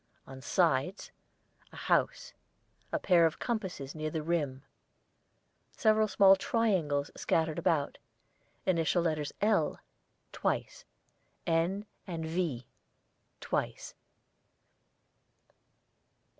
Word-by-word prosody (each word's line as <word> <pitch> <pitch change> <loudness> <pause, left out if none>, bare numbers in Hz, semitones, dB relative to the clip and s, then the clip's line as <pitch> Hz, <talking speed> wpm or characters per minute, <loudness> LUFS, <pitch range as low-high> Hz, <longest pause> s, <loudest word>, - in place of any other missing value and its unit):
on 135 0 -10
sides. 170 +3 +1 0.6
A - - -14
house. - - 0 0.6
A - - +1
pair 170 -3 +4
of 160 - -5
compasses 190 - -3
near 155 0 -3
the 155 0 -3
rim. 145 -5 -1 1.1
Several 215 -1 +4
small 195 -1 +6
triangles 185 -10 0
scattered 160 -1 0
about. 150 -4 0 0.7
Initial 170 -1 +2
letters 155 -3 -1
'L' 205 -8 +2 0.5
(twice), - - -2 0.6
'N,' 175 +5 +1 0.2
and 165 -3 -4
'V' 160 -7 -2 0.8
(twice). - - -3
165 Hz, 90 wpm, -31 LUFS, 150-190 Hz, 1.1 s, small